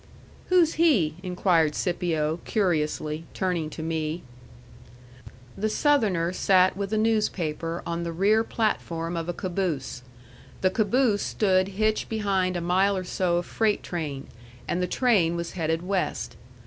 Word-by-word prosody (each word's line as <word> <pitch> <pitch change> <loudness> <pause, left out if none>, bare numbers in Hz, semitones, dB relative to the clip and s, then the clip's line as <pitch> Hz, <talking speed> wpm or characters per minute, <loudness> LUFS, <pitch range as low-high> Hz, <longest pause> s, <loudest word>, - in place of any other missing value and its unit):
"Who's 355 -3 +4
he?" 205 - +4
inquired 180 -4 +1
Scipio, 165 -3 -1
curiously, 155 -5 -1
turning 180 -5 -1
to 160 - -7
me. 160 +1 -2 1.3
The 215 +2 -1
Southerner 210 - +2
sat 185 0 +3
with 200 0 -4
a 215 - +1
newspaper 175 -7 -1
on 170 0 -3
the 170 0 -3
rear 205 +6 +3
platform 170 -7 -2
of 165 0 -3
a - - -1
caboose. 175 -9 -3 0.6
The 185 - +3
caboose 215 +1 +2
stood 185 -3 +2
hitched 215 0 +1
behind 195 -4 0
a - - -3
mile 190 +3 +2
or 185 - -3
so 180 -1 0
of 175 - -2
freight 220 -2 0
train, 150 -6 -4 0.4
and 175 - -1
the 180 - 0
train 195 -10 +2
was 170 0 -4
headed 165 -1 -1
west. 190 0 -2
180 Hz, 140 wpm, -26 LUFS, 165-205 Hz, 1.3 s, Who's